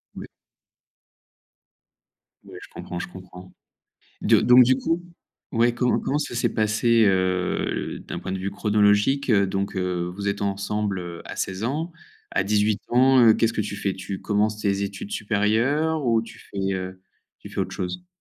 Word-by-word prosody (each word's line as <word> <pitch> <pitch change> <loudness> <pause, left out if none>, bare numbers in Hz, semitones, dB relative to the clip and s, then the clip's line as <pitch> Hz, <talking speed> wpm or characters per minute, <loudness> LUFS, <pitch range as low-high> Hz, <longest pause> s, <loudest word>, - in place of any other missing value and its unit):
Ouais. - - -8 2.2
Ouais, - - -12
je - - -12
comprends, 90 - -7
je - - -5
comprends. 90 0 -12 0.7
Do - - +4
donc 125 +1 +8
du 130 +1 +3
coup, 165 +4 -1 0.5
ouais, 120 0 +2
co 125 0 +1
comment 145 - -1
ça 145 -4 -4
s'est 120 - 0
passé, 110 +1 +3
heu, 95 -1 0
d'un - - -6
point 95 - -5
de 95 - -3
vue 95 +1 -3
chronologique, 105 +6 +2
heu, 100 -3 +4
donc, 95 +1 -3
heu, 90 -1 -2
vous 100 +1 -3
êtes 100 0 -2
ensemble, 100 0 -2
heu, 85 -1 -7
à - - -8
16 95 +2 -3
ans, 155 +7 -2 0.4
à 95 - +1
18 105 0 +1
ans, 130 +1 +5
heu, 110 -1 +7
qu'est-ce 115 0 +1
que 110 - -2
tu 100 0 -5
fais? 100 -2 -2
Tu 95 0 -6
commences 105 +1 0
tes 100 -1 0
études 100 0 -5
supérieures 120 +9 +1
ou 115 -2 +3
tu 115 - -12
fais, 100 - -10 0.2
heu, 95 0 -6 0.4
tu - - -11
fais - - -9
autre - - -2
chose? 175 - -5
105 Hz, 175 wpm, -24 LUFS, 95-120 Hz, 2.2 s, donc